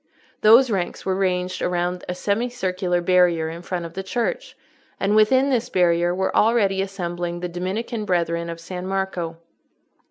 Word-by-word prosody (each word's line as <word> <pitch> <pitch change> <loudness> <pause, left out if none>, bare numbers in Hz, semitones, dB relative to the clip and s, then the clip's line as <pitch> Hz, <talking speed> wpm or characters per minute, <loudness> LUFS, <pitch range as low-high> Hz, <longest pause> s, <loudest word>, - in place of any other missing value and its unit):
Those 230 +4 +6
ranks 185 -4 -2
were 190 - +1
ranged 185 -1 -1
around 180 0 -1
a 180 - -2
semicircular 190 -4 -1
barrier 175 -3 +3
in 165 +1 -7
front 175 -1 -4
of 165 - -9
the 190 - -4
church, 235 - -3 0.4
and 200 +2 +1
within 260 +6 +4
this 245 -1 0
barrier 175 -3 +2
were 190 0 -1
already 210 -4 +3
assembling 175 -3 -4
the 180 - -2
Dominican 195 +6 -4
Brethren 170 -2 0
of 165 0 -6
San 180 +2 -6
Marco. 190 -4 -3
185 Hz, 155 wpm, -22 LUFS, 175-205 Hz, 0.4 s, Those